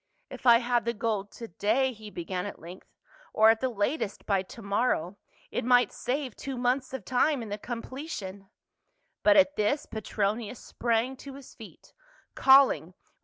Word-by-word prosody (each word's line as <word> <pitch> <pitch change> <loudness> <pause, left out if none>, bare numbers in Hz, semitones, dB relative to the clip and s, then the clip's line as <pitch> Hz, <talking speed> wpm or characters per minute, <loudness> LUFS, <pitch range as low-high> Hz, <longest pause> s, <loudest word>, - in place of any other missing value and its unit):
" - - -41
If - - -5
I 235 -1 +9
had 240 -1 0
the 235 0 -1
gold 210 -2 -2
to 230 - -8
day." 230 +8 0
he 215 -1 -11
began 180 0 -4
at - - -8
length, 175 +3 -12 0.3
" - - -26
or 220 +1 +7
at 225 - -1
the 260 - +1
latest 220 +1 -2
by 195 -2 +1
to 190 +5 -12
morrow, 200 -3 0 0.3
it - - -2
might 245 +1 +4
save 260 0 -3
two 270 -2 -6
months 250 +2 0
of 260 -7 -6
time 255 +2 +1
in 220 - -8
the 205 +1 -4
completion 230 - -7 0.2
— - - -52
" - - -48
But 310 -1 +6
at 290 0 +4
this 245 +8 +1
Petronius 215 +2 -3
sprang 235 +2 -1
to 275 0 -10
his 275 -1 -13
feet, - - -14 0.4
calling 270 +1 +7 0.2
with 180 - -20
172 - - -40
PAUL. - - -42
235 Hz, 200 wpm, -28 LUFS, 205-260 Hz, 0.4 s, I